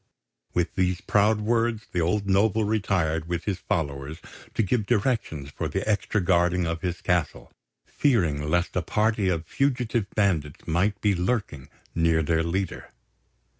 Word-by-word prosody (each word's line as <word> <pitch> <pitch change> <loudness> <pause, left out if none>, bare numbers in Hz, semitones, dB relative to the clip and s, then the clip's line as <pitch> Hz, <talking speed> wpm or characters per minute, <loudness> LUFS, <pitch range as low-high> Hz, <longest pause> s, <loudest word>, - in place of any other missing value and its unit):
With 85 -1 0
these 90 -1 +1
proud 105 +2 +2
words 115 0 0
the 90 - 0
old 100 +5 0
noble 100 +3 +3
retired 95 -7 0
with 85 -1 -2
his 95 -4 -2
followers 70 -2 -3 0.4
to - - +2
give 105 +1 0
directions 105 - 0
for - - -3
the - - -3
extra 105 0 +1
guarding 90 -1 +2
of 80 0 -3
his 90 -1 -3
castle, 90 -3 -1 0.3
fearing 80 - +1
lest 90 +2 0
a - - +2
party 105 -2 +1
of 85 -2 -1
fugitive 120 - 0
bandits 85 -9 0
might 95 +5 +1
be 105 -1 +3
lurking 90 - -2 0.2
near 80 -1 +2
their 80 +1 +1
leader. 90 +2 -3
90 Hz, 150 wpm, -26 LUFS, 80-105 Hz, 0.4 s, noble